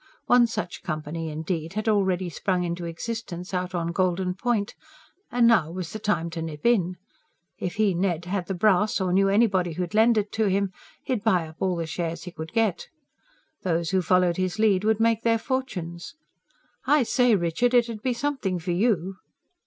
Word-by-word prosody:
One 245 -1 +5
such 180 -6 -5
company, 155 +1 -4
indeed, 160 +2 -4
had 215 +2 -3
already 190 -4 +2
sprung 180 +1 -1
into 170 0 -3
existence, 180 +1 -5
out 180 0 -2
on 170 -1 -1
Golden 180 0 0
Point; 210 +1 -1 0.6
and 240 -1 +3
now 220 -10 +4
was 175 0 -6
the 215 - -5
time 195 -6 -1
to 165 -1 -5
nip 155 -2 -7
in. 185 -7 +2 0.6
If 180 - -3
he, 210 -3 +2
Ned, 175 -1 -1
had 180 -1 -2
the 195 - -2
brass, 210 +2 +3
or 185 -2 0
knew 195 +1 +4
anybody 195 -5 +2
who'd 180 +2 -4
lend 225 +1 +4
it 210 -1 0
to 220 -1 +1
him, 195 0 +1 0.3
he'd 245 -5 -2
buy 180 -7 +2
up 160 +1 -14
all 185 -2 0
the 165 -1 -2
shares 165 +1 -4
he 180 - -7
could 160 -1 -8
get. 230 - 0 0.7
Those 170 -1 -1
who 190 -1 +2
followed 180 0 +2
his 185 +1 -1
lead 210 -3 +3
would 220 0 +2
make 225 0 +2
their 230 -1 +3
fortunes. 225 - -4 0.7
"I 295 -2 +5
say, 245 -1 +3
Richard, 195 +8 +1
it'ud 230 -3 +2
be 255 +1 0
something 255 -9 -1
for 175 +1 -3
you." 190 -1 0
185 Hz, 185 wpm, -25 LUFS, 170-220 Hz, 0.7 s, One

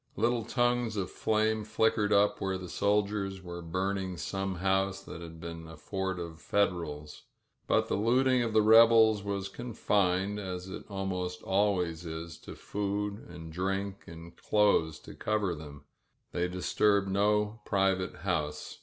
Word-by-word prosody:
Little 115 +1 +1
tongues 120 -2 +1
of 95 -2 -2
flame 110 0 +1
flickered 110 -1 +1
up 100 0 +3
where 95 -1 -1
the 90 -1 -8
soldiers 100 -1 0
were 85 -1 -7
burning 95 +2 -2
some 95 +1 -3
house 95 +1 +1
that 85 - -9
had 80 -1 -9
been 85 0 -7
a 80 -1 -11
fort 95 +3 -3
of 85 -2 -7
Federals. 80 -7 -1 0.5
But - - +2
the - - -2
looting 125 +4 +3
of 115 -2 -1
the 110 0 +4
rebels 110 -1 +7
was 100 -1 -3
confined, 100 -3 0
as 90 -2 -5
it 95 - -7
almost 90 -2 -3
always 95 -4 +1
is, 80 0 -7
to - - -10
food, 105 +1 -3
and 80 -1 -9
drink, 95 +2 -2
and 85 +1 -11
clothes 100 -7 +2
to - - -11
cover 105 -4 -1
them. 75 -2 -10 0.5
They 90 0 0
disturbed 100 +2 +2
no 105 +3 +1
private 95 -3 +1
house. 75 -5 -2
95 Hz, 150 wpm, -30 LUFS, 90-105 Hz, 0.5 s, rebels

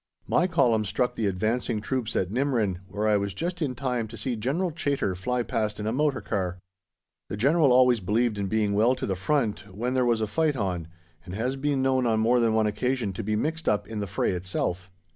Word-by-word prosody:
My 180 - +3
Column 125 -10 +3
struck 110 +5 0
the 110 - -1
advancing 110 +4 -1
troops 120 +1 -2
at 90 0 0
Nimrin, 115 -7 0
where 105 +2 -2
I 105 -1 +4
was 100 -1 -3
just 175 - -3
in 135 -5 -1
time 125 -3 -2
to 115 +2 -10
see 120 +3 -2
General 145 - -1
Chaytor 140 - -1
fly 125 +6 -1
past 110 -2 -2
in 105 - -4
a 110 - 0
motor 145 +2 +1
car. 90 -4 -2 0.7
The 105 - -4
General 140 +5 +4
always 125 -1 +5
believed 105 +3 0
in 100 - -1
being 105 0 +1
well 115 +5 +3
to - - -4
the 95 - -1
front 105 -1 -1
when 120 +7 -2
there 130 -1 +2
was 120 -2 +2
a 110 - +1
fight 155 +7 +1
on, 90 -8 -2 0.4
and 90 +1 -8
has 125 +5 -1
been 135 -1 0
known 130 -2 +2
on 110 -1 +2
more 120 +3 +3
than 115 -2 +2
one 110 -1 +3
occasion 120 0 -1
to - - -5
be 105 +2 0
mixed 160 +8 -1
up 105 - 0
in 110 -1 -5
the 100 - -3
fray 95 - 0
itself. 90 0 -3
115 Hz, 225 wpm, -26 LUFS, 105-130 Hz, 0.7 s, always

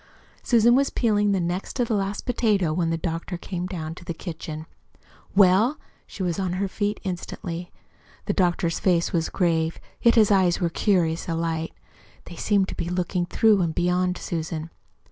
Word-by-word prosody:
Susan 235 -1 +4
was 275 +2 +3
peeling 210 -3 +2
the 195 - +2
next 175 +2 -3
to 245 - +1
the 230 - -2
last 200 0 -2
potato 210 -9 +1
when 165 0 0
the 165 - 0
doctor 165 +2 -4
came 180 0 -4
down 165 -4 -5
to 175 - -12
the 170 -1 -5
kitchen. 160 -2 -6 0.7
"Well?" 200 +8 +5 0.3
She 195 - -6
was 175 0 -1
on 185 -2 -1
her 195 +2 -1
feet 205 +2 -2
instantly. 175 -1 -5 0.5
The - - 0
doctor's 175 -3 +1
face 175 -3 +1
was 165 -2 0
grave, 165 -3 0 0.2
yet 235 - +5
his 215 -3 +5
eyes 185 -3 +3
were 175 - +1
curiously 170 -5 +1
alight. 165 0 -2 0.5
They 175 - -10
seemed 195 +2 +1
to - - -6
be 170 - -3
looking 180 0 -1
through 215 +1 +4
and 165 -2 -1
beyond 180 +1 +1
Susan. 160 -1 -4
180 Hz, 175 wpm, -24 LUFS, 165-200 Hz, 0.7 s, Well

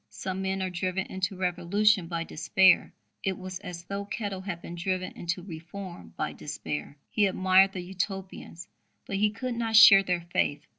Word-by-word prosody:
Some 190 0 -5
men 190 0 -1
are 185 - -2
driven 185 +2 -2
into 190 +1 -2
revolution 185 +2 +2
by 165 -1 -3
despair: 185 +4 +3 0.3
it 190 -1 -1
was 185 0 -7
as 175 -3 -8
though 200 +2 -4
Kettle 200 -2 -4
had 190 -3 -5
been 170 - -9
driven 185 +1 -2
into 175 +1 -4
reform 170 - -9
by - - -2
despair. 75 - -6
He 210 -2 +3
admired 190 +1 +4
the 185 - -4
Utopians, 190 -2 -5 0.4
but 195 - -3
he 210 +1 +3
could 250 +4 -4
not 230 -1 -1
share 200 -2 +10
their 180 -2 -1
faith. 145 0 +1
185 Hz, 170 wpm, -28 LUFS, 175-195 Hz, 0.4 s, share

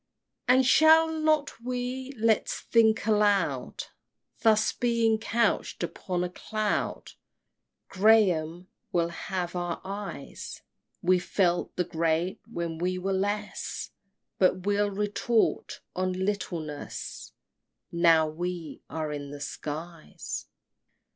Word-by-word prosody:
XXIII. 250 - +6
And 260 0 +4
shall 320 +4 +6
not 310 -5 +1
we? 250 +1 -3
Let's 220 0 +1
think 225 -1 +3
aloud! 210 -2 +1 0.6
Thus 215 -1 +4
being 230 -2 +2
couch'd 230 +1 0
upon 180 -1 -2
a 180 - -2
cloud, 215 +3 -2 0.8
Graham, 185 -5 +3 0.2
we'll 170 -1 +1
have 180 +1 -4
our 175 -1 -2
eyes! 200 +1 -7 0.4
We 180 +1 +4
felt 175 -1 0
the 180 - +1
great 165 +1 -1
when 170 -5 -3
we 180 +1 0
were 195 +2 -1
less, 205 +1 -2 0.5
But 185 0 +3
we'll 205 0 +2
retort 210 +3 0
on 185 0 0
littleness 180 -6 -4 0.6
Now 165 -2 +5
we 170 +1 -5
are 155 -2 -3
in 145 -1 -5
the 145 0 -8
skies. 150 - -6
190 Hz, 110 wpm, -28 LUFS, 170-220 Hz, 0.8 s, XXIII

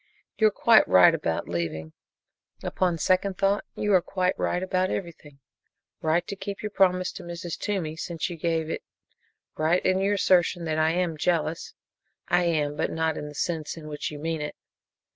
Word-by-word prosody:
You 220 - +5
are - - +5
quite 220 +2 +5
right 90 -1 +7
about - - -2
leaving. 80 -2 -4 0.7
Upon 180 -2 0
second 185 +3 +1
thought, 200 +1 +1
you 210 -1 0
are 185 - +6
quite 185 0 0
right 180 - -1
about 185 0 0
everything 155 -6 -6 0.6
right 165 +2 +1
to 200 - -5
keep 200 +1 -6
your 210 - -3
promise 185 -2 +2
to - - -9
Mrs. 170 -1 -5
Toomey, 180 -7 -3
since 165 0 -3
you 175 - -6
gave 165 -1 -1
it, - - -3 0.7
right 165 +4 +1
in 185 0 +3
your 200 +1 +2
assertion 180 -2 +2
that 155 -1 -1
I 155 0 +3
am 175 -3 -1
jealous. 160 0 -1 0.5
I 175 0 +3
am 150 -3 0
but - - -1
not 160 -1 -1
in 150 - -5
the 150 - -10
sense 160 0 -3
in 155 -2 -9
which 150 -1 -4
you 150 - -8
mean 160 +1 -3
it. 150 - -5
170 Hz, 185 wpm, -26 LUFS, 155-185 Hz, 0.7 s, right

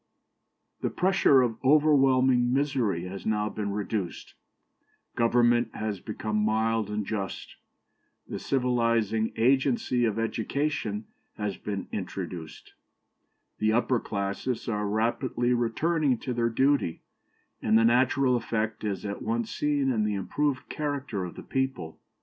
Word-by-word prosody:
The - - 0
pressure 180 -8 +4
of 115 0 -3
overwhelming 130 -4 +4
misery 130 - 0
has 95 0 -7
now 105 -1 0
been 105 -1 -4
reduced; 100 -2 -4 0.8
government 120 0 +3
has 105 -2 -3
become 105 +1 -3
mild 110 0 +1
and 105 0 -2
just; 100 -3 -5 0.7
the - - -5
civilizing 115 -4 +1
agency 130 - +2
of 110 -2 0
education 115 -1 -2 0.3
has 105 -2 -2
been 100 +1 -5
introduced; 90 -4 -6 0.9
the 110 0 +2
upper 120 +1 +2
classes 100 +4 -3
are 105 -2 -1
rapidly 120 +3 0
returning 135 +4 +1
to 125 - -4
their 115 -1 +1
duty, 135 - +1 0.6
and 110 0 +4
the 115 - +4
natural 125 +2 +3
effect 110 -2 -2
is 105 -1 -3
at 100 0 -4
once 115 0 -2
seen 145 -2 +1
in 110 -4 +1
the 105 -1 0
improved 135 +7 -1
character 140 -9 -3
of 90 - -8
the - - -9
people. 130 -12 -3
115 Hz, 125 wpm, -27 LUFS, 105-130 Hz, 0.9 s, pressure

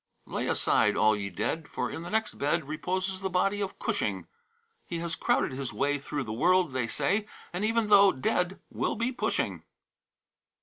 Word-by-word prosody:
"Lay - - -3
aside, - - +2
all 110 0 +5
ye 100 -1 -3
dead, 155 - -2
For - - -3
in - - -5
the 175 - -7
next 220 +2 -1
bed 150 +1 0
Reposes 185 +5 -2
the 190 - -1
body 195 +3 +1
of 195 -1 -3
Cushing; - - -1 0.6
He 170 - -3
has 170 0 -3
crowded - - +1
his 130 -1 -4
way 140 +6 0
Through 140 +1 -3
the 110 -3 -5
world, 180 +5 +3
they 125 -3 0
say, 205 - 0 0.3
And 180 +3 -2
even 225 +1 +2
though 200 -2 +7
dead 180 +7 -1
will - - -1
be 235 +2 0
pushing." 250 - -1
175 Hz, 180 wpm, -29 LUFS, 140-195 Hz, 0.6 s, though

